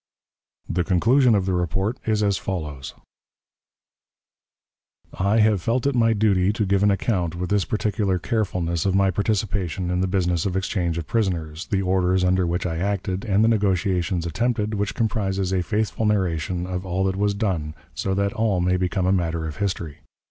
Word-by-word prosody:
The 90 - 0
conclusion 115 +7 +4
of 95 -2 +1
the 95 - 0
report 95 +7 -1
is 105 -1 +2
as 100 -2 +1
follows: 75 -8 -5 2.2
"I 100 +4 +1
have 105 -3 +3
felt 115 +7 0
it 140 - +2
my 115 -2 +3
duty 100 -3 +2
to 105 0 -1
give 100 0 +1
an 105 - +4
account 95 -4 0
with 90 +2 -4
this 100 -2 +2
particular 105 -3 0
carefulness 85 -3 -1
of 95 - +1
my 95 0 +3
participation 95 -4 -1
in 90 0 0
the 95 - +1
business 90 -2 0
of 95 -1 -1
exchange 90 -3 -1
of 85 - -3
prisoners, 85 -6 -2
the 95 -1 0
orders 95 0 +2
under 90 0 +2
which 85 +2 -1
I 80 -2 -2
acted, 95 0 -2
and 100 0 +2
the - - +4
negotiations 95 -5 +1
attempted, 110 +4 -1
which 100 -1 -2
comprises 100 -5 -1
a 95 - +2
faithful 110 +3 -1
narration 90 -3 0
of 90 0 -4
all 95 0 -1
that 95 -1 0
was 100 +1 0
done, 90 -8 -2 0.2
so 95 -1 -2
that 100 0 0
all 110 -4 +1
may 90 +1 +2
become 90 0 -1
a 95 - +3
matter 85 -3 0
of 80 - -6
history. 90 -7 -3
95 Hz, 180 wpm, -23 LUFS, 90-105 Hz, 2.2 s, conclusion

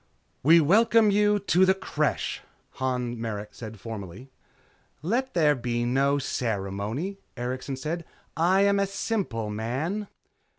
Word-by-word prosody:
"We 165 +5 +7
welcome 215 +6 +5
you 205 +1 +3
to 190 -2 +3
the 190 0 +5
Creche," 195 - -1 0.4
Han 125 -3 -2
Merrick 105 -2 -4
said 110 -2 -9
formally. 110 +3 -8 0.7
"Let 245 +8 -1
there 155 -4 +5
be 120 -2 -2
no 135 +3 +2
ceremony," 115 - -3 0.2
Erikson 130 +3 -3
said, 155 +6 -4 0.3
"I 180 +4 +3
am 200 0 +4
a 200 - +2
simple 190 - -2
man." 135 - -2
140 Hz, 125 wpm, -26 LUFS, 120-195 Hz, 0.7 s, We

